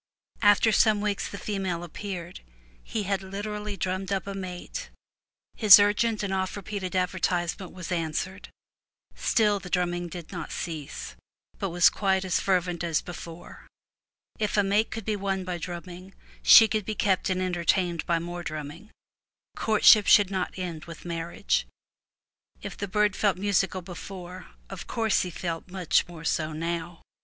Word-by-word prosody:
After 205 +1 +5
some 215 0 +4
weeks 205 -1 -1
the 200 - -7
female 190 -5 -3
appeared; 180 0 -6 0.4
he 210 - -3
had 195 0 -1
literally 205 +1 -5
drummed 185 +1 -2
up 195 -2 -1
a 200 - -5
mate; 185 - -6 0.7
his 210 -3 +9
urgent 210 +2 +2
and 195 -1 -2
oft 190 -1 -1
repeated 195 -2 -5
advertisement 180 -1 -1
was 180 -1 -8
answered. 175 +3 -3 0.6
Still 210 -3 +2
the 185 -2 -9
drumming 175 -1 0
did 170 -1 -9
not 175 -4 -6
cease, 155 -5 -6 0.4
but 195 - -1
was 175 0 +5
quite 190 -2 0
as 185 - +1
fervent 180 -2 0
as 165 -2 +1
before. 170 -1 -10 0.7
If 210 -1 0
a 205 - +5
mate 205 +3 +2
could 225 -2 -6
be 215 - 0
won 195 -1 -2
by 180 -1 -4
drumming 180 +2 -8 0.3
she 225 - +9
could 215 -1 -1
be 215 +2 -4
kept 195 -3 +1
and 185 0 0
enter 180 -2 -2
tained 175 -2 +1
by 170 - +2
more 175 +1 -5
drumming; 155 +5 -7 0.7
courtship 215 -1 +5
should 200 -2 +6
not 190 -1 -2
end 175 -3 -5
with 170 0 -11
mar 170 0 -4
riage. - - 0 1.0
If - - -6
the 200 - -4
bird 210 +1 +1
felt 200 -4 +1
musical 190 -1 0
before, 180 0 -9 0.2
of - - -8
course 225 -3 +1
he 180 - -3
felt 165 0 -5
much 180 -3 +1
more 170 -2 -10
so 155 -1 0
now. 170 +1 -4
185 Hz, 160 wpm, -27 LUFS, 175-200 Hz, 1.0 s, his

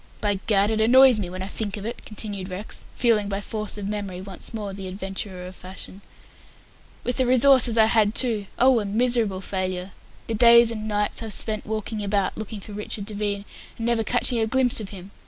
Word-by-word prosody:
"By 205 -2 0
Gad, 205 0 +3
it 220 0 0
annoys 255 +1 +6
me 185 -4 -3
when 185 +1 -5
I - - -5
think 205 0 -3
of 205 - -7
it," 230 - -6
continued 205 -3 -5
Rex, 185 +4 -6
feeling, 215 -4 +2
by 195 0 -2
force 215 0 -4
of 200 -1 -5
memory, 200 -3 -4
once 190 0 -7
more 210 -4 -5
the 190 -1 -7
adventurer 190 -1 -6
of 185 +1 -9
fashion. 190 +2 -9 1.0
"With 245 - -2
the 260 - +2
resources 255 -2 +5
I 220 - +6
had, 220 -1 +2
too. 220 -6 +3
Oh, 255 -1 +5
a 210 - -3
miserable 220 -2 +1
failure! 185 -1 -3 0.3
The 230 - -3
days 235 +1 +7
and 215 -1 -5
nights 210 +1 -1
I've 220 -2 +1
spent 215 0 -3
walking 215 0 -3
about 200 -1 0
looking 220 -1 -6
for 210 - -10
Richard 205 0 -4
Devine, 205 -1 -3 0.3
and 230 - -4
never 235 -1 +1
catching 245 +1 +1
a 220 - +1
glimpse 255 0 +1
of 210 -3 -6
him. 195 -1 -10
210 Hz, 205 wpm, -24 LUFS, 195-230 Hz, 1.0 s, days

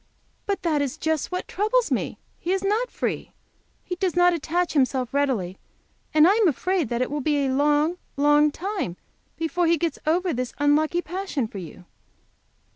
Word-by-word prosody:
"But 400 -1 -1
that 310 -4 +1
is 275 -3 -2
just 315 0 -1
what 365 - -3
troubles 435 +5 +1
me. - - -1 0.2
He 350 - -2
is 385 0 -1
not 430 +5 +1
free. - - -3 0.5
He 360 - -4
does 365 -2 -1
not 355 0 +5
attach 340 +2 -1
himself 260 -3 +1
readily, 240 -11 0 0.5
and 310 +1 +6
I 385 - +6
am 440 -4 +4
afraid 345 - 0
that 240 +1 0
it - - -5
will 295 0 -2
be 290 0 +1
a - - 0
long, 295 +5 +2 0.2
long 295 +1 +5
time 355 - -4 0.4
before 335 +1 0
he 335 0 +4
gets 325 -1 -2
over 350 +2 +2
this 250 -1 -3
unlucky 305 +4 +2
passion 350 - -3
for 205 - -8
you." 180 +1 -10
315 Hz, 180 wpm, -24 LUFS, 280-360 Hz, 0.5 s, and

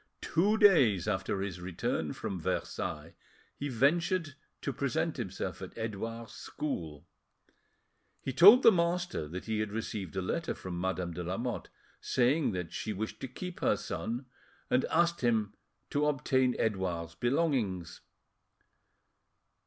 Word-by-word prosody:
Two 205 +6 +2
days 135 - +5
after 95 -1 -1
his 95 -3 -4
return 90 -1 -2
from 95 - -4
Versailles, - - -3 0.4
he 145 - -4
ventured 155 - +2 0.3
to - - -1
present - - -1
himself - - -4
at - - -8
Edouard's 115 0 -5
school. 85 - -5 1.1
He 135 - -4
told 205 - +9
the 230 - +9
master 175 - 0
that 90 +4 -6
he 110 -1 -1
had 110 -1 -1
received 105 -5 -4
a 95 - 0
letter 165 - -2
from 90 -2 -5
Madame 90 -2 -2
de 90 +1 -4
Lamotte, 115 +8 -3 0.3
saying 130 +4 +2
that 90 -2 -4
she 110 - -3
wished 110 +3 -4
to - - -4
keep 180 +8 -7
her - - +2
son, 120 +4 -4 0.5
and 130 - +3
asking 170 -7 +2
him 110 -3 0 0.4
to 150 +1 +2
obtain 130 -3 +2
Edouard's 90 -6 -1
belongings. 120 - 0
115 Hz, 135 wpm, -31 LUFS, 95-150 Hz, 1.1 s, told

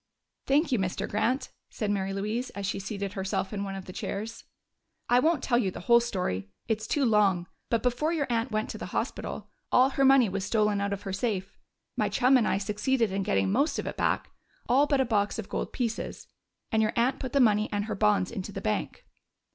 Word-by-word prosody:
"Thank 290 +2 +3
you, 245 - +2
Mr. 185 -1 -2
Grant," 240 +6 0 0.2
said 210 -3 -2
Mary 195 -1 -1
Louise, 215 +6 -2
as 200 0 -3
she 195 - -2
seated 200 0 -4
herself 190 +1 -2
in 200 -1 -2
one 195 -1 -4
of 190 -1 -7
the 185 - -9
chairs. 215 +5 -5 0.6
"I 245 - +5
won't 315 0 +2
tell 240 -2 +2
you 200 -6 +1
the 180 - -8
whole 235 +6 +6
story 180 - -2 0.2
it's 220 0 -1
too 280 +3 +1
long. 200 -6 +3 0.2
But 230 - +1
before 255 +6 +1
your 315 -4 0
aunt 235 +1 0
went 215 0 -2
to - - -7
the - - -5
hospital, - - -4 0.2
all 260 +2 +5
her 275 - +1
money 270 -3 +6
was 195 0 -3
stolen 210 -1 +1
out 200 0 -1
of 200 0 -4
her 195 - -4
safe. 195 -2 -2 0.4
My - - +1
chum 255 +2 +4
and 245 -4 +4
I - - +2
succeeded 210 +3 0
in 195 +1 -1
getting 195 -1 +1
most 280 +9 +1
of - - -3
it - - -4
back - - 0 0.4
all 275 +4 +4
but 280 -3 +2
a - - +2
box 210 -3 0
of 220 - -6
gold - - -3
pieces 230 -3 -3 0.5
and 220 -1 +3
your 215 0 +1
aunt 255 +3 +2
put 260 -3 -4
the 280 - +3
money 215 -4 +4
and 205 0 -1
her 220 - -3
bonds 105 - +2
into - - -5
the - - -5
bank. - - -3
215 Hz, 225 wpm, -28 LUFS, 195-250 Hz, 0.6 s, whole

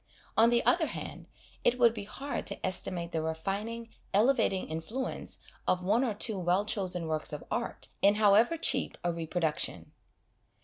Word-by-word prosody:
On 225 +1 +6
the 240 0 +2
other 340 -3 +3
hand, - - -7 0.4
it 245 - +3
would 235 -2 +5
be 210 -3 -6
hard 275 +7 -5
to - - -1
estimate 175 -2 -1
the 160 - -1
refining, 200 +9 -3 0.3
elevating 220 -4 +2
influence 165 +12 -4 0.3
of 180 0 +1
one 215 +7 +2
or 225 -5 -1
two 210 -1 +1
well 180 +3 +1
chosen 185 -5 -1
works 155 0 -1
of 150 - -6
art, 235 - -3
in 200 +1 +5
however 215 +8 +4
cheap 265 -4 +2
a 175 -1 0
reproduction. 165 -1 -2
200 Hz, 160 wpm, -30 LUFS, 175-235 Hz, 0.4 s, On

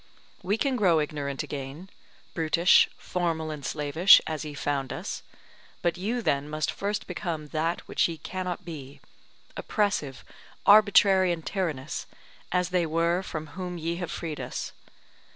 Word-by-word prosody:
We 200 +3 0
can 265 +2 0
grow 180 -7 +4
ignorant 145 -2 -3
again, 145 +4 -7 0.5
brutish, 165 +2 +4
formal 165 -3 -2
and 150 -2 -7
slavish, 155 +7 +5
as 155 -1 -3
ye 150 -1 -7
found 140 -2 -2
us; - - -5 0.6
but 175 -1 +2
you 225 +6 -2
then 140 -3 0
must 155 -2 -1
first 205 +1 -3
become 160 -5 -4
that 165 +3 -2
which - - +2
ye 165 -1 -5
cannot 185 +3 -5
be, 145 -5 -8 0.6
oppressive, 200 - -1 0.4
arbitrary 200 -3 +6
and 165 -2 -4
tyrannous, 155 -8 -3 0.4
as 180 0 +1
they 180 -2 +1
were 170 +3 +1
from 160 -4 -5
whom 180 0 -5
ye 170 +1 -2
have 175 -2 -4
freed 160 -3 -5
us. - - -5
165 Hz, 145 wpm, -27 LUFS, 150-185 Hz, 0.6 s, arbitrary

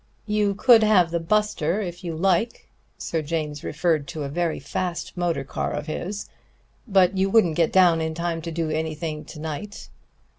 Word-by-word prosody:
You 210 -2 +1
could 235 +1 +6
have 195 -6 +4
the 170 - 0
Buster, 195 -1 0
if 175 -4 -5
you 170 -2 -4
like" 190 +6 0 0.3
Sir 165 - -2
James 150 -1 -3
referred 155 -2 0
to 155 - -5
a 140 - -4
very 170 +2 -1
fast 175 +5 -4
motor 175 -6 -1
car 135 - -3
of 145 0 -4
his 190 +6 -4 0.6
"but 190 -3 +4
you 195 +1 +2
wouldn't 195 -6 +4
get 165 -1 +2
down 175 -3 +5
in 160 0 -2
time 170 0 -2
to 165 +1 -5
do 160 -1 -2
anything 155 0 -3
to 155 - -10
night." 160 +7 -6
170 Hz, 180 wpm, -24 LUFS, 155-190 Hz, 0.6 s, could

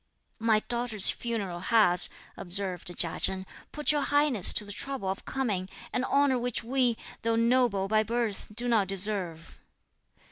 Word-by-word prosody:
"My 220 -1 +2
daughter's 235 -4 +2
funeral 205 -7 -4
has," 180 -3 +4 0.3
observed 185 0 -1
Chia 165 -2 +1
Chen, 190 0 -1 0.3
"put 300 0 +1
your 295 -1 0
Highness 290 -9 +4
to 210 - -1
the 205 - -8
trouble 265 0 -4
of 195 - -5
coming, 205 -9 -3 0.2
an 250 - -1
honour 280 -2 +2
which 245 -1 -3
we, 245 -1 0 0.2
though 230 0 0
noble 230 -4 +1
by 215 +1 +2
birth, 225 -2 -3
do 245 +2 0
not 220 -5 +2
deserve." 190 -4 -2
220 Hz, 150 wpm, -28 LUFS, 195-245 Hz, 0.3 s, has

